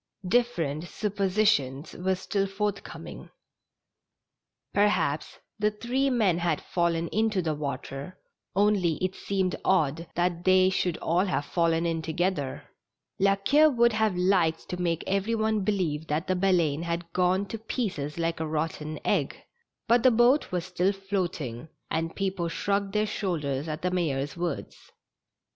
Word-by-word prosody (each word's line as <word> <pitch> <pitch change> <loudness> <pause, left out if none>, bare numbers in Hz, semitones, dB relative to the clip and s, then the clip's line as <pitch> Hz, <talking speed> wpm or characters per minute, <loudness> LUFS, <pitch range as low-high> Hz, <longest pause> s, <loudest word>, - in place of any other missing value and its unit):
Different 175 -9 +1
suppositions 195 -9 0
were 190 +1 0
still 195 +1 -1
forthcoming. 200 0 -5 1.4
Per 205 +1 +5
haps 150 -7 -1 0.2
the 210 0 +3
three 245 +6 -1
men 210 -9 +2
had 170 -3 0
fallen 170 -1 0
into 215 -2 +1
the 160 -3 0
water, 140 +2 -5 0.4
only 200 -4 +3
it 185 +3 -2
seemed 190 -2 -1
odd 165 -3 +1
that 175 0 0
they 185 0 +5
should 180 -2 0
all 175 +4 +1
have 170 -6 -1
fallen 165 0 +1
in 165 -1 0
together. 160 -3 -2 0.6
La 195 +1 +4
Queue 290 +11 +4
would 235 -4 +3
have 215 -3 +1
liked 180 -3 +2
to 180 0 -3
make 170 -2 0
every 200 +4 0
one 220 -1 +1
believe 170 -7 -1
that 155 +4 -1
the 185 - 0
Baleine 175 -5 +2
had 170 0 -4
gone 185 +2 +2
to 220 +2 -6
pieces 195 - -3
like 165 -1 -1
a 160 - -2
rotten 155 0 -3
egg, - - +1 0.5
but 235 +1 +5
the 255 - +6
boat 245 +5 +3
was 180 -1 -1
still 185 +1 +1
floating, 175 - -3 0.2
and 165 0 -1
people 190 -3 -1
shrugged 200 +3 -1
their 210 0 +2
shoulders 155 -9 -2
at 155 +1 -5
the 180 - +1
mayor's 145 -6 -1
words. 170 -4 -5
180 Hz, 150 wpm, -27 LUFS, 165-200 Hz, 1.4 s, the